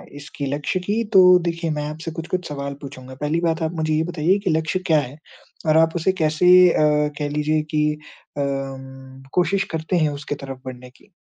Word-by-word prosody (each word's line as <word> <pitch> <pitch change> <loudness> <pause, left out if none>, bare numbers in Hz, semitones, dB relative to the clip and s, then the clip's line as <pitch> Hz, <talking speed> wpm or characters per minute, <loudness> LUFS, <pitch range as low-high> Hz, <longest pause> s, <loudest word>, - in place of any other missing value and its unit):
इसकी 145 0 -7
लक्ष्य 150 +5 -2
की, 210 +5 -1
तो 180 -1 +7
देखिए 170 -1 -2
मैं 150 - -2
आपसे 160 +2 -6
कुछ-कुछ 170 +2 -4
सवाल 140 -1 -4
पूछूँगा? 130 -1 -10
पहली 155 +3 0
बात, 165 -1 0
आप 160 - -1
मुझे 155 -1 -1
ये 155 +1 +2
बताइए 175 +3 +1
कि - - +2
लक्ष्य 160 +3 0
क्या 155 -2 +4
है? 140 +1 -6 0.5
और 155 +1 +4
आप 160 +1 +3
उसे 180 +3 +1
कैसे 155 +3 +2 0.3
अम, 150 -1 +2
कह 145 -1 -2
लीजिये 150 +1 0
की 150 0 +2
अ, 150 - -12 1.3
कोशिश 195 +2 +2
करते 160 +3 -1
हैं 155 -2 +2
उसकी 145 0 -5
तरफ 135 -1 -8
बढ़ने 125 -1 -9
की? 200 +10 -25
155 Hz, 190 wpm, -21 LUFS, 150-170 Hz, 1.3 s, तो